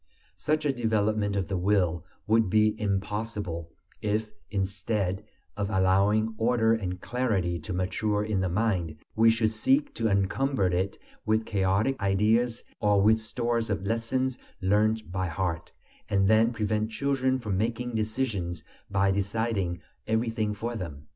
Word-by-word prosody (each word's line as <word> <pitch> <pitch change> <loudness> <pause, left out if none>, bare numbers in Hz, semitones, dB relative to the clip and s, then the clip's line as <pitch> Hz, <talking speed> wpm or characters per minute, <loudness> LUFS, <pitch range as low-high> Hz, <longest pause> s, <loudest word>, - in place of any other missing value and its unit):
Such 155 0 0
a 140 - +2
development 110 -3 0
of 95 -2 -1
the 95 - -2
will 90 -4 +1 0.2
would 110 -2 +3
be 110 +1 +4
impossible 100 -4 -2 0.3
if, 105 0 -1 0.2
instead 100 0 -1 0.3
of 100 -1 -2
allowing 100 +3 +3
order 115 -1 +3
and 90 -5 -2
clarity 100 -7 -1
to 80 - -7
mature 105 +3 0
in 105 -2 -1
the 95 -1 0
mind, 90 -5 0 0.2
we 115 +1 +6
should 115 -1 +2
seek 275 - +1
to 115 - 0
encumber 100 +5 +1
it 90 +2 0 0.3
with 110 +1 +1
chaotic 100 +6 +1
ideas, 110 +5 +2 0.2
or 105 -1 +3
with 110 +3 +5
stores 115 0 -1
of 100 -2 -2
lessons 125 +4 -1 0.2
learnt 105 +1 +1
by 95 0 -1
heart, 85 0 -3 0.4
and 95 -1 +3
then 110 +3 +4
prevent 110 -1 -1
children 130 +1 0
from 105 -6 -3
making 120 +2 -2
decisions 110 -6 -2 0.3
by 100 0 +2
deciding 100 -3 -1 0.3
everything 110 -1 0
for 115 +3 -4
them. 75 -8 -6
105 Hz, 140 wpm, -28 LUFS, 95-115 Hz, 0.4 s, we